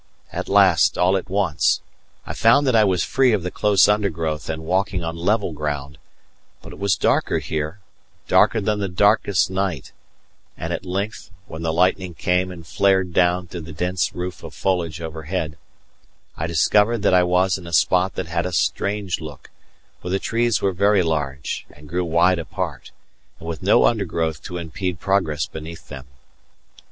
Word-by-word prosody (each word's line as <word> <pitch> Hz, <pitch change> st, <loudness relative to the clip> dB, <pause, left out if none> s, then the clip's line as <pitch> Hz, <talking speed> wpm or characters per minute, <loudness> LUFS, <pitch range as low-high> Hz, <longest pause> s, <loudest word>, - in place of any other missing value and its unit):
At -, -, -4 dB
last, 95 Hz, -5 st, +4 dB
all 90 Hz, +2 st, +3 dB
at 95 Hz, -1 st, -3 dB
once, 90 Hz, -8 st, +1 dB, 0.5 s
I -, -, -5 dB
found 120 Hz, +6 st, +4 dB
that 130 Hz, -3 st, +2 dB
I 110 Hz, -, +6 dB
was 95 Hz, -4 st, +1 dB
free 130 Hz, -3 st, +2 dB
of 100 Hz, -5 st, 0 dB
the 90 Hz, -, -3 dB
close 100 Hz, -1 st, +4 dB
undergrowth 85 Hz, -8 st, -1 dB
and 80 Hz, 0 st, -4 dB
walking 95 Hz, +1 st, 0 dB
on 80 Hz, 0 st, -4 dB
level 95 Hz, +1 st, 0 dB
ground; 70 Hz, -2 st, -4 dB, 0.6 s
but -, -, -10 dB
it -, -, -12 dB
was 100 Hz, -3 st, +2 dB
darker -, -, +1 dB
here 80 Hz, +5 st, -4 dB, 0.5 s
darker 115 Hz, -, +4 dB
than 105 Hz, 0 st, -1 dB
the 100 Hz, -1 st, -2 dB
darkest 100 Hz, 0 st, +2 dB
night; 95 Hz, -7 st, -2 dB, 0.7 s
and -, -, -4 dB
at -, -, -5 dB
length, 100 Hz, +5 st, -4 dB, 0.2 s
when 80 Hz, -, -8 dB
the 80 Hz, -1 st, -1 dB
lightning 90 Hz, +1 st, +1 dB
came 90 Hz, +2 st, 0 dB
and 85 Hz, -2 st, -10 dB
flared 95 Hz, +2 st, +1 dB
down 90 Hz, 0 st, +2 dB
through 85 Hz, 0 st, -8 dB
the 80 Hz, +1 st, -9 dB
dense 90 Hz, +3 st, -1 dB
roof 90 Hz, 0 st, -5 dB
of 80 Hz, -5 st, -9 dB
foliage 85 Hz, +1 st, -1 dB
overhead, 80 Hz, 0 st, -4 dB, 0.8 s
I 80 Hz, -, -3 dB
discovered 105 Hz, +7 st, +2 dB
that 100 Hz, -, +3 dB
I 90 Hz, -, +6 dB
was 90 Hz, +1 st, +2 dB
in 85 Hz, -, -11 dB
a -, -, -8 dB
spot 90 Hz, +4 st, +2 dB
that 95 Hz, -, -3 dB
had 85 Hz, +2 st, -2 dB
a -, -, -5 dB
strange 100 Hz, 0 st, -1 dB
look, 75 Hz, -4 st, -10 dB, 0.5 s
where 90 Hz, -, -6 dB
the 95 Hz, -, +1 dB
trees 115 Hz, +1 st, 0 dB
were 95 Hz, -1 st, +2 dB
very 100 Hz, +1 st, +3 dB
large 75 Hz, -5 st, -3 dB
and 75 Hz, +1 st, -15 dB
grew 90 Hz, +3 st, -1 dB
wide 85 Hz, +2 st, +3 dB
apart, 80 Hz, -, -5 dB, 0.5 s
and 80 Hz, -, -11 dB
with 85 Hz, -1 st, -5 dB
no -, -, +4 dB
undergrowth 85 Hz, -8 st, 0 dB
to 90 Hz, -, -5 dB
impede 85 Hz, +1 st, -4 dB
progress 85 Hz, -8 st, 0 dB
beneath 80 Hz, +1 st, -10 dB
them. 65 Hz, -3 st, -9 dB
90 Hz, 175 wpm, -22 LUFS, 80-100 Hz, 0.8 s, I